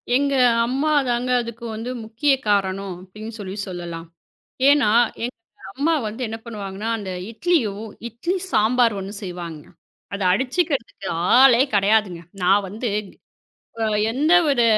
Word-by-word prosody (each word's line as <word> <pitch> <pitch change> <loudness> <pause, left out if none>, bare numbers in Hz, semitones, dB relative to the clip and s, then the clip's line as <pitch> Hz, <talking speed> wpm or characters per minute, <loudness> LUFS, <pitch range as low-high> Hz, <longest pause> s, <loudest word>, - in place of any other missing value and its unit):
எங்க 280 +1 +2 0.3
அம்மா 275 +5 0 0.2
தாங்க, 240 +1 0
அதுக்கு 235 0 -8
வந்து 225 +3 -5 0.2
முக்கிய 230 +7 +1 0.2
காரணம், 195 -2 0
அப்பிடின்னு 215 +4 -9
சொல்லி 190 -2 -6
சொல்லலாம். 170 -2 -6 0.6
ஏன்னா, 280 -7 +5 0.3
எங்க 245 - -3 0.4
அம்மா 295 +8 +1
வந்து 220 +4 -5
என்ன 220 0 -5
பண்ணுவாங்கன்னா, 210 -1 -5
அந்த 200 -3 -6 0.2
இட்லியும், 225 - 0 0.2
இட்லி 255 - -3 0.2
சாம்பார் 230 +1 +3
ஒண்ணு 195 +1 -6
செய்வாங்க. 175 -5 -7 0.5
அத 200 - -4
அடிச்சுக்கிறதுக்கு 260 - -2 0.3
ஆளே 255 -1 +7
கிடையாதுங்க. 200 -3 +2 0.2
நான் 195 +2 +4
வந்து 220 +3 -3 0.9
அ - - +2 0.3
எந்த 295 +7 +2 0.2
ஒரு 260 -4 +3
220 Hz, 125 wpm, -22 LUFS, 195-255 Hz, 0.9 s, ஆளே